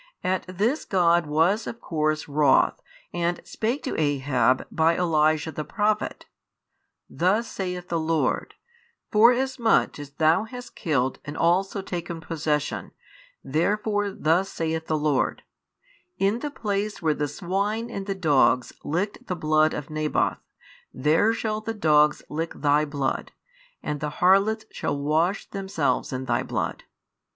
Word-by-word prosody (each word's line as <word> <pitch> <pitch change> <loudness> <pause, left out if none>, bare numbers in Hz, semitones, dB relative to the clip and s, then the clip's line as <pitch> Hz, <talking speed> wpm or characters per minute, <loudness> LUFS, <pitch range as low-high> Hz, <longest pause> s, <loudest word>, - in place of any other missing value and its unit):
At 185 0 0
this 210 - 0
God 175 -3 +2
was 165 +9 +2
of 230 - -6
course 155 -5 -1
wroth, 145 0 +3 0.3
and 175 0 -1
spake 235 +6 -2
to 265 - -3
Ahab 135 -3 +2
by 165 +1 +2
Elijah 155 -2 +2
the 155 0 -4
prophet: 215 +3 -1 0.8
Thus 200 +7 +1
saith 180 -3 -5
the 170 - 0
Lord, 160 0 0 0.6
Forasmuch 240 - +3
as 145 -1 -7
thou 160 +7 +3
hast 245 +2 -9
killed 135 -5 0
and 145 +1 -7
also 190 +4 +1
taken 170 -2 -5
possession, 155 -2 -2 0.5
therefore 205 +7 0
thus 180 +1 +1
saith 160 -2 -3
the 155 - +1
Lord, 150 -3 0 0.7
In 200 +4 +1
the 295 - -3
place 210 -5 -3
where 155 -1 +3
the 150 0 -2
swine 205 - -2
and 195 -3 -5
the 195 - -1
dogs 145 -7 +3
licked 200 +10 -3
the 180 - -2
blood 155 -1 +2
of 150 +1 -6
Naboth, 155 0 0 0.5
there 155 +11 +3
shall 215 -1 -2
the 225 +1 -4
dogs 150 -6 +3
lick 165 +2 -3
thy 150 +1 +2
blood; 140 -2 -3 0.5
and 150 - -3
the 150 - -2
harlots 200 +4 +3
shall - - -2
wash 160 +7 0
themselves 190 -10 -1
in 130 0 -4
thy 120 -1 +1
blood. - - -3
170 Hz, 140 wpm, -25 LUFS, 150-205 Hz, 0.8 s, wroth